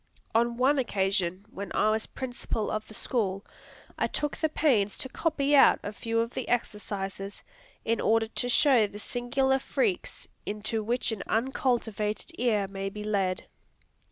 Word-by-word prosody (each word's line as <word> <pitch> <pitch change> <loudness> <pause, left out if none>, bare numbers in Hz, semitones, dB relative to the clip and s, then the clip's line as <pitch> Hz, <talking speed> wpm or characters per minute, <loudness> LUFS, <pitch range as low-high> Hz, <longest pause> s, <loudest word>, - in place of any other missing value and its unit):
On 235 +1 +2
one 270 +3 +4
occasion, 195 -5 0
when 200 +1 -6
I 215 - +4
was 220 0 0
Principal 245 -4 -3
of 215 0 -3
the 215 - -11
School, 200 -5 -1 0.5
I - - +2
took 295 -1 -2
the 315 - 0
pains 230 -11 +2
to 260 - -2
copy 290 -1 +1
out 275 - +7
a 205 - -4
few 230 +2 -1
of 230 +1 -3
the 260 - -4
exercises, 200 -4 -3 0.4
in 230 0 +1
order 225 0 +3
to 245 +1 -1
show 245 -4 +5
the 205 - -10
singular 265 +4 0
freaks 380 - -1 0.2
into 215 +2 -2
which 240 +2 0
an 215 -3 -3
uncultivated 225 - 0
ear 215 -5 +2
may 195 0 -4
be 210 +1 -7
led. 195 -3 0
225 Hz, 155 wpm, -28 LUFS, 205-255 Hz, 0.5 s, out